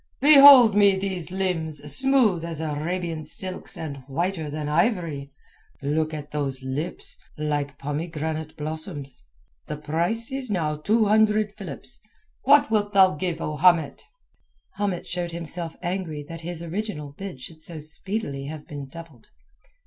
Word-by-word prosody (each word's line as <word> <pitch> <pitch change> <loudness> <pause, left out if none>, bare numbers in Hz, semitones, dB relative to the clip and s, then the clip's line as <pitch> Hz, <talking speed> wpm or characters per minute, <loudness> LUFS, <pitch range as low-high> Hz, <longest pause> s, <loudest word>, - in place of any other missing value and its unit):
"Behold 275 -6 +9
me 200 -2 +5
these 190 -5 -3
limbs, 180 -5 -1 0.2
smooth 260 -10 +3
as 165 -2 -5
Arabian 160 +2 -3
silks 185 +4 -5
and 150 -4 -5
whiter 165 +2 -2
than 150 0 -4
ivory. 150 - 0 0.5
Look 155 +2 0
at 150 -2 -7
those 135 -3 -2
lips 145 +7 -2 0.2
like 145 -2 -2
pomegranate 155 +1 -4
blossoms. 155 -3 -6 0.4
The - - -4
price 170 - 0
is 265 -2 -4
now 160 -6 0
two 215 +8 +2
hundred 215 0 +3
philips. - - -8 0.4
What 280 -3 +5
wilt 205 -1 +1
thou 190 -1 +6
give, 165 +1 -3
O 150 0 -3
Hamet?" 165 -2 +3 0.8
Hamet 200 -3 -1
showed 175 -1 -3
himself 170 0 -5
angry 175 -5 -3
that 165 +1 -8
his 170 0 -4
original 170 -4 -4
bid 185 -1 -8
should 155 +5 -10
so 165 +1 -5
speedily 155 -2 -4
have 150 +1 -7
been 145 -2 -7
doubled. 160 -4 -12
165 Hz, 140 wpm, -25 LUFS, 150-195 Hz, 0.8 s, Behold